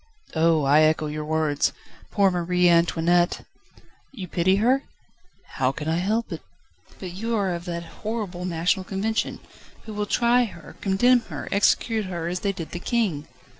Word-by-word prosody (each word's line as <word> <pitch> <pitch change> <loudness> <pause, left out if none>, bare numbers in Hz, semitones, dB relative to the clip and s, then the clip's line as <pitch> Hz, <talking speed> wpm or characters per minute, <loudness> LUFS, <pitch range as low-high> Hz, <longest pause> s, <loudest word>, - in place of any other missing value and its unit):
"Oh! 160 -1 +3
I 145 +3 +5
echo 155 0 +3
your 150 0 -4
words. 155 -2 +1 0.4
Poor 200 -2 +3
Marie 180 0 +2
Antoinette!" 170 0 +2 0.7
"You 200 -9 -7
pity 180 +3 +2
her?" 250 +7 +3 0.8
"How 130 0 +2
can 150 +2 -6
I 160 +1 +1
help 215 +6 -1
it?" - - -5 0.6
"But 180 -2 -7
your 205 -2 -1
are 170 - -3
that 170 -1 -5 0.2
horrible 210 -5 -4
National 180 +2 0
Convention, 220 +4 -2 0.4
who 220 - -8
will 210 0 -2
try 240 +2 +3
her, 170 -7 -11
condemn 245 +6 +4
her, - - -6
execute 215 +2 +2
her 170 -3 -4
as 180 +1 -2
they 200 - 0
did 170 -4 -7
the 175 - -5
King." 190 - -1
180 Hz, 160 wpm, -24 LUFS, 165-210 Hz, 0.8 s, I